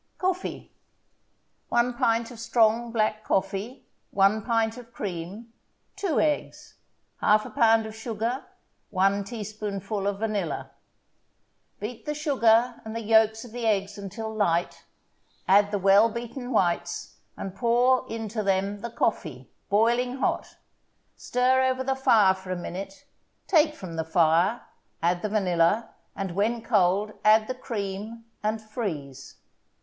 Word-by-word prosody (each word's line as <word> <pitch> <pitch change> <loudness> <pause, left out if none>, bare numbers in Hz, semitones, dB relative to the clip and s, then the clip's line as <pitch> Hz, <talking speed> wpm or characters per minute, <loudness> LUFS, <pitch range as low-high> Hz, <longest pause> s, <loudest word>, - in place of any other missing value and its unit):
COFFEE 370 0 -3 1.0
1 240 +1 +2
pint 230 0 +1
of 235 - -11
strong 230 0 +2
black 215 -1 0
coffee 200 +7 -2 0.2
1 200 +2 +3
pint 225 0 0
of 240 -2 -12
cream 200 +4 -6 0.4
2 390 -5 0
eggs 300 -1 -1 0.5
1/2 215 0 +3
pound 225 -4 +4
of 220 0 -8
sugar 230 +3 -3 0.5
1 195 +1 +2
teaspoonful 210 -2 -4
of 200 -1 -1
vanilla 205 -7 -3 1.1
Beat 220 +3 -7
the 300 - -1
sugar 245 -5 +2
and 220 -1 -7
the 230 - -3
yolks 220 +1 +3
of 240 - -12
the 235 0 -3
eggs 200 -1 0
until 220 +3 -6
light, 175 -5 0 0.6
add 200 +1 +5
the 205 - -1
well 200 +3 +5
beaten 240 +3 -6
whites, 175 -7 -1 0.2
and 195 - -5
pour 250 +3 +2
into 225 -1 -3
them 195 0 0
the 235 - -5
coffee, 155 - -2 0.2
boiling 240 +4 +2
hot. 265 - -2 0.6
Stir 255 +1 +2
over 260 0 +1
the 270 +1 0
fire 220 -7 +5
for 190 0 -12
a 185 - -1
minute, 195 +7 -7 0.4
take 310 -3 +3
from 170 - -8
the 160 - 0
fire, 165 +6 +2 0.4
add 175 +1 +2
the 215 - -2
vanilla, 195 +1 +1 0.2
and, 195 -2 -3
when 220 +5 0
cold, 205 -1 +2
add 215 +1 +5
the 255 - -2
cream, 220 -1 -5 0.2
and 215 +1 -2
freeze. 155 - -6
220 Hz, 135 wpm, -26 LUFS, 195-235 Hz, 1.1 s, add